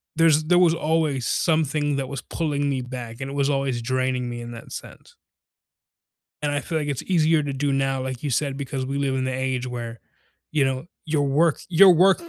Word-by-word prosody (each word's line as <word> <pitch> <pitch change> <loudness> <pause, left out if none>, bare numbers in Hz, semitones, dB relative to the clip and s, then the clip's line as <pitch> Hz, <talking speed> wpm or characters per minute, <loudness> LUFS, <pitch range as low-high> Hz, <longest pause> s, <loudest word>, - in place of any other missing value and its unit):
there's 160 -2 +4
there 175 +2 +4
was 170 -2 +5
always 155 -5 0
something 150 -3 +1
that 135 -2 -3
was 140 -3 -5
pulling 145 -3 -2
me 135 -2 -1
back 125 -1 -7
and 135 - -4
it 140 - -6
was 140 0 +1
always 135 -3 0
draining 130 +1 -1
me 120 0 -5
in 120 0 -7
that 115 -1 -10
sense. - - -10 1.3
And 145 -1 0
I 145 - 0
feel 160 0 -2
like 150 -1 -3
it's 140 -3 -2
easier 160 -3 +3
to 145 -1 -3
do 140 +1 0
now, 135 -1 0
like 130 -1 -5
you 145 - -2
said, 135 +2 0
because 135 -1 -4
we 140 +1 -3
live 140 -1 0
in 130 0 -1
the 130 - -1
age 130 -1 -2
where, 120 -2 -6 0.5
you 150 -3 +3
know, 135 +3 -2 0.2
your 150 -2 +1
work 150 +3 +3
your 185 +2 +8
work 190 - +4
140 Hz, 215 wpm, -24 LUFS, 130-155 Hz, 1.3 s, your